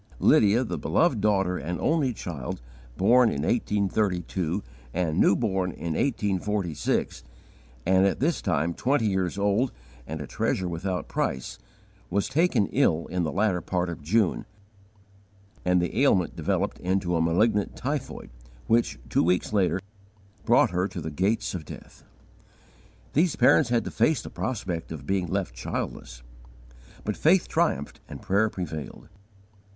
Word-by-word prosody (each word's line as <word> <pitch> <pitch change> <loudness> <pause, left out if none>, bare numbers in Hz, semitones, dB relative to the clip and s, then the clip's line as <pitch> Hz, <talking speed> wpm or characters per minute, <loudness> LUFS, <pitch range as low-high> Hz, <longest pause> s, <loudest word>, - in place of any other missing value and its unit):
Lydia, 105 +4 +4
the 120 - -4
beloved 145 -11 +2
daughter 95 -3 +1
and 85 +3 -4
only 155 -5 +1
child, 80 - -5 0.4
born 120 +5 +5
in 70 - -2
1832 95 -4 0 0.3
and 85 -1 0
new - - +5
born 95 -5 0
in 85 -1 -4
1846, 100 - -1 0.6
and 95 +1 +4
at 95 - -1
this 160 +4 +1
time 80 +4 0
twenty 130 +2 +1
years 95 -2 -1
old 105 +5 +1 0.4
and 80 +1 -5
a 75 - -5
treasure 90 +6 -1
without 90 +2 -3
price, 65 -1 -3 0.5
was 100 +2 0
taken 160 - +2
ill 85 - +2
in 90 0 0
the 80 -3 -1
latter 95 +2 +1
part 90 +1 -1
of 85 - -6
June, 95 +5 +1 1.2
and 90 0 +3
the 85 +2 -2
ailment 95 -11 +3
developed - - -1
into 90 -1 0
a 80 - +2
malignant 100 +6 +2
typhoid 135 - -4 0.3
which, 115 +1 +2
two - - +2
weeks 90 +5 +1
later, 95 -2 +2 0.7
brought - - +4
her 90 +2 0
to 95 - -7
the 80 - -5
gates 100 +8 0
of 90 -4 -4
death. - - -12 1.1
These 165 +2 +2
parents 145 -7 +4
had 120 -1 +2
to - - -5
face 135 +6 +2
the - - -8
prospect 95 -11 -4
of 75 -4 -7
being 95 0 0
left - - -2
childless. - - -5 0.8
But 105 - -2
faith 175 +3 +3
triumphed 160 - 0
and - - -7
prayer 100 +3 +1
prevailed. 80 -7 -6
95 Hz, 145 wpm, -26 LUFS, 85-110 Hz, 1.2 s, born